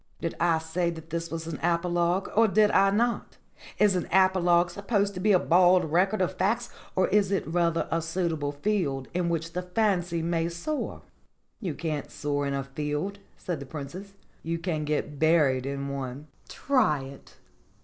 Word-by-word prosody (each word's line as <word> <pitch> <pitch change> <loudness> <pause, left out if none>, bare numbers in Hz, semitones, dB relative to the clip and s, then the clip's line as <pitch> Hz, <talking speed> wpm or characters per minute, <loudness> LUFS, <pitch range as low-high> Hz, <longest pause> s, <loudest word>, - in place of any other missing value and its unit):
"Did 165 - -3
I 170 -1 +3
say 160 +2 -1
that 165 -1 -8
this 170 0 -3
was 165 0 -5
an 160 -2 -5
apologue 175 +2 +1
or 225 +1 +5
did 210 +1 +4
I 195 0 +5
not? 235 +4 0 0.4
Is 210 -2 +4
an 180 - -1
apologue 180 -2 +4
supposed 200 +1 0
to 180 - -6
be 210 +3 +3
a 190 - +7
bald 180 -1 +4
record 190 +4 +2
of 180 - -1
facts 235 +5 0 0.2
or 185 - +3
is 200 -1 +2
it 195 - 0
rather 170 0 0
a 165 - +1
suitable 165 -3 -2
field 145 -5 -1
in 175 -1 0
which 165 0 -2
the 180 - -2
fancy 180 -3 0
may 165 0 0
soar?" 225 - -4 0.6
"You 180 -9 -4
can't 155 -4 -3
soar 145 -1 -2
in 140 - -1
a 135 - -2
field," 150 +8 -3 0.2
said 175 -5 -4
the 140 - -8
Princess. 175 +8 -8 0.3
"You 165 0 -2
can 165 -3 -2
get 150 -1 -2
buried 150 -5 +3
in 140 0 -3
one. 140 0 -5 0.2
Try 225 - +1
it. 135 +1 -12
170 Hz, 180 wpm, -27 LUFS, 155-190 Hz, 0.6 s, a